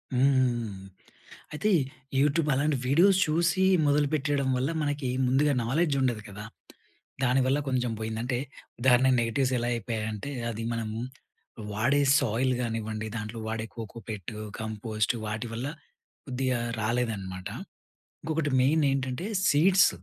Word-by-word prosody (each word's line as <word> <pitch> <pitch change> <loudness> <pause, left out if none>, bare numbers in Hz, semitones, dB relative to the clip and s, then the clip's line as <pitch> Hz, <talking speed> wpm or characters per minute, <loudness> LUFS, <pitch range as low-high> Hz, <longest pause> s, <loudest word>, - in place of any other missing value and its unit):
హ్మ్. 125 -6 +2 0.7
అయితే 210 +8 0 0.5
యూట్యూబ్ 150 +2 +2
అలాంటి 145 +1 +1
వీడియోస్ 180 +8 +5
చూసి 170 +4 +2 0.2
మొదలుపెట్టేయడం 145 -1 +1
వల్ల 130 +4 0
మనకి 145 -3 -1 0.2
ముందుగా 140 +3 +3
నాలెడ్జ్ 150 +4 +1
ఉండదు 120 -5 0
కదా! 105 +1 -8 0.8
దానివల్ల 130 +2 +3
కొంచెం 125 -2 0
పోయిందంటే 115 +3 -2 0.4
ఉదాహరణకి 130 +1 +4
నెగటివ్స్ 130 +3 0
ఎలా 120 0 -1
అయిపోయాయి 110 -1 -3
అంటే 105 +5 -5 0.2
అది 115 0 -5
మనము 110 -1 -3 0.7
వాడే 140 +7 +2 0.2
సాయిల్ 130 +1 +1
గానివ్వండి, 110 -2 -3
దాంట్లో 105 +2 -5
వాడే 110 0 -3
కోకో 115 0 -7
పెట్టు 105 0 -6 0.2
కంపోస్ట్ 110 0 -1
వాటి 110 +3 -3
వల్ల 120 +4 -3 0.6
కొద్దిగా 130 -2 -1 0.2
రాలేదనమాట. 110 -5 -2 0.7
ఇంకొకటి 155 -2 -1
మెయిన్ 150 +4 +3
ఏంటంటే, 135 +7 -2 0.2
సీడ్స్ 185 +6 +5
125 Hz, 115 wpm, -28 LUFS, 110-145 Hz, 0.8 s, వీడియోస్